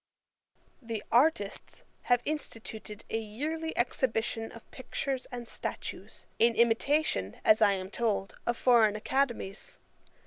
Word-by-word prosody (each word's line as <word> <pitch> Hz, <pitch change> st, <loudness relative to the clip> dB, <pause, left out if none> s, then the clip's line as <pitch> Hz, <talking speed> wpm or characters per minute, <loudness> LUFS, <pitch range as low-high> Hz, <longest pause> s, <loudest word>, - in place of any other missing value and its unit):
'The 225 Hz, -3 st, -4 dB
Artists 240 Hz, -5 st, +1 dB, 0.3 s
have 245 Hz, -1 st, +4 dB
instituted 225 Hz, -7 st, -5 dB
a 225 Hz, -, +1 dB
yearly 300 Hz, +10 st, -3 dB
Exhibition 225 Hz, -2 st, 0 dB
of 230 Hz, -, -14 dB
pictures 260 Hz, 0 st, -3 dB
and 240 Hz, -1 st, -6 dB
statues, -, -, -6 dB
in 230 Hz, 0 st, +5 dB
imitation, 235 Hz, -, +2 dB
as 215 Hz, -, +6 dB
I 200 Hz, -, +6 dB
am 190 Hz, 0 st, -4 dB
told, 215 Hz, -4 st, -1 dB
of 240 Hz, -1 st, +1 dB
foreign 230 Hz, -4 st, +5 dB
academies. 235 Hz, -3 st, -1 dB
230 Hz, 115 wpm, -30 LUFS, 215-260 Hz, 0.3 s, as